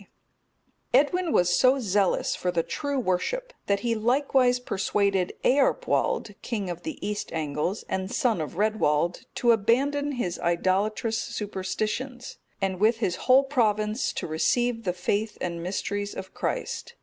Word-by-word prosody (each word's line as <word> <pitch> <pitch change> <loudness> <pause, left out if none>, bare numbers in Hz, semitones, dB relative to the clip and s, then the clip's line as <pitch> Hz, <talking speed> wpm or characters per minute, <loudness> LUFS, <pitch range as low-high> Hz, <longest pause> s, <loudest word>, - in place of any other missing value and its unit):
D.] - - -19 0.9
Edwin 325 +5 +3
was 175 -6 +3
so 260 +1 +5
zealous 200 -6 +1
for 180 - -2
the 170 -2 +1
true 285 - -3
worship, 480 - -1
that 200 0 +1
he 235 -1 +1
likewise 250 +2 +2
persuaded 195 -4 0
Earpwald, 290 - +2
king 205 -6 -3
of 175 - -7
the 315 - -5
East 210 0 -3
Angles, 155 +5 -2
and 190 0 -3
son 230 -9 +1
of 155 +2 -6
Redwald, 180 -6 +1
to 240 - +4
abandon 280 +7 +2
his 185 -9 -2
idolatrous 200 +6 0
superstitions, 215 +3 -4 0.2
and 190 -2 -1
with 220 +3 +4
his 190 -6 0
whole 265 +2 +7
province 220 -4 +1
to - - -4
receive 230 +9 0
the 180 - 0
faith 205 +4 -1
and 170 -2 -3
mysteries 200 +3 -3
of 190 0 -7
Christ. 475 - -3
215 Hz, 145 wpm, -26 LUFS, 185-250 Hz, 0.9 s, whole